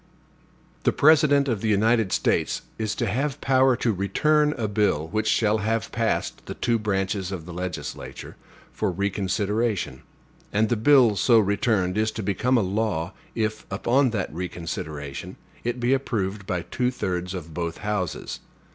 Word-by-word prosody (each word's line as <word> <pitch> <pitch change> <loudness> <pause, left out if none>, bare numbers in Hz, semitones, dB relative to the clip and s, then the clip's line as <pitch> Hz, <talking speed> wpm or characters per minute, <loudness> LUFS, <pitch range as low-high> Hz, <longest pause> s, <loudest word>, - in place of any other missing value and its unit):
The - - +3
President 145 -2 +5
of 115 -6 -1
the 110 - -1
United 110 0 +3
States - - +1 0.2
is 110 -1 -1
to 120 - -1
have 135 +7 -1
power 130 -2 +4
to 115 -2 0
return 150 - +2
a 110 -3 -1
bill, 100 -7 +1
which 110 +3 -1
shall 110 -1 +2
have 110 +2 -1
passed 115 -1 -1
the - - -5
two 120 -1 +1
branches 95 -2 -1
of 90 -5 -5
the 90 - -8
legislature, 90 0 -6 0.4
for - - -1
reconsideration; 100 - -1 0.5
and 110 +1 +2
the 120 - +2
bill 120 -1 +5
so 115 +5 +5
returned 100 -2 +1
is 110 0 +2
to 110 - -4
become 110 +7 +1
a - - +3
law, 95 -3 -1 0.2
if, 110 -1 -2
upon 125 +7 +2
that 100 -9 -3
reconsideration, 80 -5 -5 0.3
it 120 +1 -2
be 120 +2 +2
approved 105 -7 -2
by 90 -2 -1
two 125 +6 -1
thirds 90 -6 -3
of 85 -3 -7
both 85 0 -3
houses. 105 -5 -2
105 Hz, 155 wpm, -25 LUFS, 95-120 Hz, 0.5 s, President